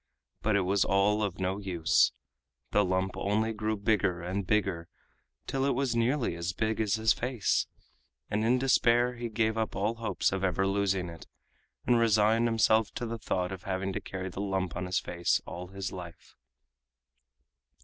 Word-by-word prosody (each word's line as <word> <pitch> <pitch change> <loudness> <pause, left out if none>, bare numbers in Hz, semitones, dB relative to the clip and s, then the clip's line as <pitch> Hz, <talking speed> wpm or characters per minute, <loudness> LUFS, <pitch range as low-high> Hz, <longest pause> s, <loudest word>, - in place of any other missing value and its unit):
But 110 -1 +1
it 100 - +3
was 95 +1 +2
all 100 +2 +2
of 100 -3 -2
no 95 +2 -1
use. 85 -9 +2 0.6
The 105 - +4
lump 95 0 -1
only 110 +3 0
grew 110 0 -2
bigger 100 -4 +1
and 90 +2 -3
bigger 95 -6 0 0.6
till 135 0 -1
it 140 -1 +1
was 130 -2 0
nearly 120 - +1
as 85 +2 -3
big 110 +2 -1
as 105 -1 +1
his 110 0 +3
face, 125 -3 0 0.6
and 105 +1 -1
in 120 +3 +3
despair 125 -1 +3
he 120 -1 -5
gave 110 0 0
up 110 - -2
all 105 +4 -1
hopes 115 -1 0
of 95 0 -2
ever 95 0 +1
losing 95 -2 0
it, 85 -1 -10 0.6
and 120 -1 +4
resigned 110 +1 +3
himself 110 -1 +3
to 120 - -3
the 115 0 -4
thought 90 -4 -2
of 95 -2 -6
having 95 +1 -3
to - - -3
carry 95 0 -5
the 95 - -6
lump 95 -3 -2
on 90 +1 -3
his 95 +1 0
face 85 0 0
all 90 +1 -7
his 95 +1 -5
life. 90 -3 -10
100 Hz, 180 wpm, -29 LUFS, 95-110 Hz, 0.6 s, The